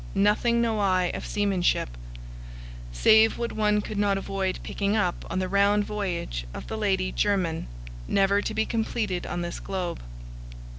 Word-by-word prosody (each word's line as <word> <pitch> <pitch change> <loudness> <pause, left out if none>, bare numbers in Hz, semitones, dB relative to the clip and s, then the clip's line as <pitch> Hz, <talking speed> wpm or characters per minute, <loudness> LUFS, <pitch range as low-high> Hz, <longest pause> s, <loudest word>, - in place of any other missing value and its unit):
Nothing 215 +4 +3
know 225 -2 0
I 185 -3 +2
of - - -5
seamanship, 195 - +1 1.0
save 220 - +5
what 235 0 -2
one 210 -1 +1
could 205 0 -5
not 200 -1 +2
avoid 195 -1 -2
picking 200 +1 -1
up 180 -5 0
on - - -3
the 185 0 0
round 200 +2 +3
voyage 175 - -3
of - - -7
the - - -5
Lady 190 -3 0
Jermyn, 185 -6 0 0.4
never 200 +1 +3
to - - -3
be 220 - +1
completed 220 -5 -2
on 175 - -3
this 175 - -5
globe. 185 -3 -4
200 Hz, 155 wpm, -26 LUFS, 185-210 Hz, 1.0 s, save